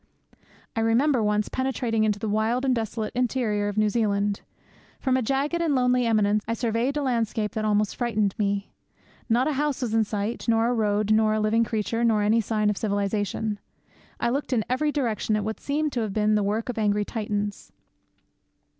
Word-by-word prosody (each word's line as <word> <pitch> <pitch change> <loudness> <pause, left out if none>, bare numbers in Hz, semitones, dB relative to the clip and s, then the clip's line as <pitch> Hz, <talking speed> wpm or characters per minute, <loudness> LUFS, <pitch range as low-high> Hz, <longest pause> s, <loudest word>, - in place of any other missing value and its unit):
I - - 0
remember 235 +4 +3
once 210 0 +1
penetrating 250 -4 -1
into 210 -1 +1
the 220 - -4
wild 220 +5 0
and 260 - +3
desolate 220 -2 -3
interior 235 -4 0
of 205 0 -4
New 215 0 +3
Zealand. 205 -2 0 0.6
From 260 -2 +1
a 260 - +2
jagged 275 +7 0
and 315 -4 +1
lonely 250 -1 +2
eminence 210 -2 +2
I 230 - -1
surveyed 235 +4 -1
a 295 - -1
landscape 230 -4 -1
that 215 -1 -3
almost 210 -1 +1
frightened 215 -5 0
one. 200 -1 0 0.7
Not 240 +4 +3
a 305 - 0
house 285 -1 -1
was 225 -3 -2
in 225 0 +4
sight, 210 +3 -3
nor 225 0 +3
a - - +1
road, 210 -2 +1
nor 215 0 +4
one 215 0 0
living 225 +2 +3
creature, 225 +1 -1
nor 220 -3 +3
any 220 +2 +3
sign 215 -1 +1
of 205 - -5
civilization. 205 0 -1 0.6
I 235 - +1
looked 275 +1 -2
in 220 -3 +1
every 295 +4 0
direction 230 -6 -1
at 210 - -1
what 220 +1 -4
seemed 300 +1 -1
to 245 - -1
have 215 -3 -2
been 215 0 +2
the 210 - +3
work 210 +3 -1
of 235 - -3
angry 210 -1 +1
Titans. 205 -2 -4
220 Hz, 195 wpm, -25 LUFS, 210-245 Hz, 0.7 s, in